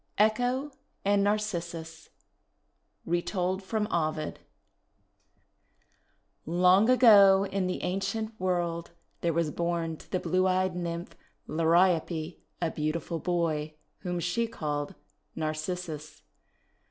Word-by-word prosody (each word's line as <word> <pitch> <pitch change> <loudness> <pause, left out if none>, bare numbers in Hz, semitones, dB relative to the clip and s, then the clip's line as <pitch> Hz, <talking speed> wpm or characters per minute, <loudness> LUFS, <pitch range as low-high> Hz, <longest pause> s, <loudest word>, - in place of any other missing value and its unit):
ECHO 245 +7 +2 0.3
AND 200 0 +3
NARCISSUS 170 -6 -3 1.0
Retold 180 +2 -1
from 210 +2 -1
Ovid 155 -2 -1 2.1
LONG 180 +6 +4
ago, 200 -6 +7
in 195 -1 -1
the 185 - -3
ancient 195 +4 -2
world, 175 -2 -1 0.3
there 170 - +1
was 165 -1 0
born 170 -1 -2
to - - -16
the 185 - 0
blue 185 +2 +1
eyed 185 0 +1
Nymph 170 -1 -4 0.3
Liriope 165 0 +2 0.2
a 170 -2 0
beautiful 160 +2 -2
boy, 160 -3 -1 0.2
whom 180 -1 -3
she 180 +8 0
called 145 -7 -4 0.4
Narcissus. 155 0 -4
175 Hz, 100 wpm, -29 LUFS, 165-195 Hz, 2.1 s, ago